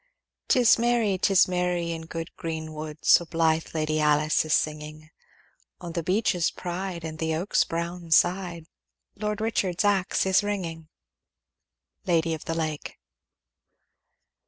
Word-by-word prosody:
'Tis 245 Hz, -2 st, +5 dB
merry, 235 Hz, -4 st, +2 dB
'tis 195 Hz, -1 st, +4 dB
merry, 180 Hz, -2 st, -1 dB
in 165 Hz, -1 st, -6 dB
good 165 Hz, 0 st, -6 dB
green 160 Hz, -1 st, -5 dB
wood, 155 Hz, 0 st, -7 dB
So -, -, +6 dB
blithe 165 Hz, -1 st, +1 dB
Lady 155 Hz, 0 st, 0 dB
Alice 150 Hz, 0 st, +3 dB
is 155 Hz, 0 st, -1 dB
singing; 155 Hz, 0 st, -3 dB, 0.7 s
On 175 Hz, -2 st, -7 dB
the 170 Hz, -, -1 dB
beech's 180 Hz, -1 st, +1 dB
pride, 180 Hz, -1 st, -5 dB
and 155 Hz, -1 st, -6 dB
the 160 Hz, 0 st, -1 dB
oak's 175 Hz, +5 st, +1 dB
brown 170 Hz, +1 st, -5 dB
side, 175 Hz, 0 st, +2 dB, 0.5 s
Lord 210 Hz, 0 st, -3 dB
Richard's 205 Hz, -4 st, 0 dB
axe 195 Hz, -3 st, +1 dB
is 190 Hz, 0 st, +4 dB
ringing. 170 Hz, -6 st, -4 dB, 1.2 s
Lady 165 Hz, -2 st, +2 dB
of 155 Hz, -, -6 dB
the 165 Hz, -, -2 dB
Lake. 155 Hz, -2 st, -4 dB
170 Hz, 135 wpm, -26 LUFS, 160-185 Hz, 1.2 s, So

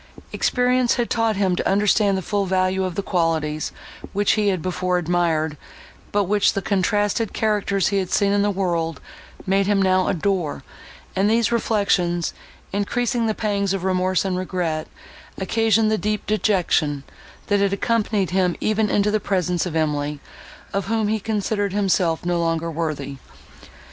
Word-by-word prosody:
Experience 250 Hz, -1 st, +2 dB
had 240 Hz, -1 st, -2 dB
taught 225 Hz, -2 st, +1 dB
him 190 Hz, -2 st, +1 dB
to -, -, -1 dB
understand 200 Hz, 0 st, +3 dB
the 190 Hz, -, -4 dB
full 200 Hz, 0 st, -1 dB
value 185 Hz, 0 st, +1 dB
of 180 Hz, -2 st, -4 dB
the 200 Hz, -, -2 dB
qualities, 160 Hz, -4 st, -1 dB, 0.4 s
which 205 Hz, 0 st, +2 dB
he 210 Hz, -1 st, +1 dB
had 190 Hz, -3 st, +1 dB
before 180 Hz, +1 st, -1 dB
admired, 165 Hz, -3 st, 0 dB, 0.5 s
but 205 Hz, 0 st, +2 dB
which 200 Hz, +1 st, +2 dB
the 195 Hz, -, -2 dB
contrasted 205 Hz, +2 st, 0 dB
characters 205 Hz, -3 st, +1 dB
he 200 Hz, -, 0 dB
had 185 Hz, -2 st, -3 dB
seen 200 Hz, -1 st, +2 dB
in 205 Hz, 0 st, +2 dB
the 205 Hz, -, +2 dB
world 170 Hz, -4 st, -1 dB, 0.5 s
made 195 Hz, +1 st, +2 dB
him 205 Hz, -1 st, +2 dB
now 185 Hz, -1 st, +3 dB
adore; 180 Hz, -3 st, -1 dB, 0.5 s
and 195 Hz, +2 st, +2 dB
these 230 Hz, 0 st, +2 dB
reflections, 200 Hz, -7 st, +1 dB, 0.4 s
increasing 230 Hz, +3 st, 0 dB
the 215 Hz, -, 0 dB
pangs 200 Hz, -3 st, 0 dB
of 190 Hz, -, -4 dB
remorse 185 Hz, 0 st, +1 dB
and 185 Hz, -1 st, -1 dB
regret, 175 Hz, -4 st, -2 dB, 0.5 s
occasioned 220 Hz, +2 st, +2 dB
the 215 Hz, -, +1 dB
deep 210 Hz, 0 st, -2 dB
dejection, 180 Hz, -9 st, +1 dB, 0.4 s
that 205 Hz, -1 st, +1 dB
had 200 Hz, -1 st, +2 dB
accompanied 205 Hz, -3 st, 0 dB
him 180 Hz, -2 st, +1 dB
even 215 Hz, 0 st, +1 dB
into 205 Hz, +1 st, +2 dB
the 215 Hz, -, +1 dB
presence 180 Hz, -3 st, 0 dB
of 165 Hz, -, -5 dB
Emily, 150 Hz, -2 st, -1 dB, 0.5 s
of 195 Hz, -1 st, -1 dB
whom 220 Hz, -1 st, 0 dB
he 220 Hz, 0 st, 0 dB
considered 205 Hz, -1 st, -1 dB
himself 185 Hz, -5 st, +1 dB
no 175 Hz, -1 st, +1 dB
longer 165 Hz, 0 st, -1 dB
worthy. 150 Hz, -4 st, -3 dB
195 Hz, 160 wpm, -22 LUFS, 175-210 Hz, 0.5 s, understand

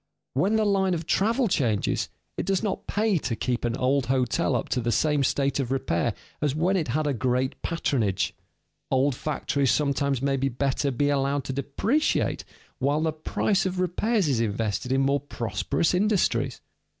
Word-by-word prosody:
When 190 Hz, +11 st, +2 dB
the 220 Hz, -1 st, +2 dB
line 190 Hz, -2 st, +2 dB
of 165 Hz, -1 st, -4 dB
travel 230 Hz, +8 st, +2 dB
changes, 120 Hz, -, 0 dB, 0.3 s
it -, -, -3 dB
does 195 Hz, -1 st, +1 dB
not 200 Hz, -3 st, -3 dB
pay 210 Hz, -4 st, +1 dB
to 120 Hz, -, -2 dB
keep 125 Hz, +1 st, -2 dB
an 120 Hz, +1 st, -1 dB
old 130 Hz, 0 st, +1 dB
hotel 130 Hz, 0 st, +1 dB
up 120 Hz, -, -1 dB
to 125 Hz, -, 0 dB
the 120 Hz, 0 st, 0 dB
same 150 Hz, +2 st, +2 dB
state 140 Hz, +1 st, +1 dB
of 130 Hz, -2 st, -2 dB
repair 85 Hz, -11 st, 0 dB, 0.3 s
as 145 Hz, -2 st, +1 dB
when 175 Hz, +5 st, +2 dB
it 170 Hz, -5 st, 0 dB
had 150 Hz, +6 st, 0 dB
a 145 Hz, -, +1 dB
great 130 Hz, +1 st, -1 dB
patronage. 115 Hz, -, 0 dB, 0.6 s
Old 135 Hz, +1 st, +2 dB
factories 140 Hz, 0 st, -1 dB
sometimes 140 Hz, -1 st, +1 dB
may 135 Hz, +1 st, 0 dB
better 135 Hz, +1 st, 0 dB
be 145 Hz, +2 st, +1 dB
allowed 140 Hz, 0 st, +1 dB
to 130 Hz, -, -4 dB
depreciate 195 Hz, -, 0 dB, 0.4 s
while 145 Hz, +3 st, +1 dB
the 160 Hz, -1 st, 0 dB
price 195 Hz, +5 st, 0 dB
of 185 Hz, 0 st, -3 dB
repairs 190 Hz, +2 st, +1 dB
is 130 Hz, -5 st, +1 dB
invested 110 Hz, +2 st, -1 dB
in 135 Hz, +1 st, +3 dB
more 140 Hz, +1 st, +2 dB
prosperous 120 Hz, -, -1 dB
industries. 180 Hz, -, +1 dB
140 Hz, 175 wpm, -26 LUFS, 130-175 Hz, 0.6 s, in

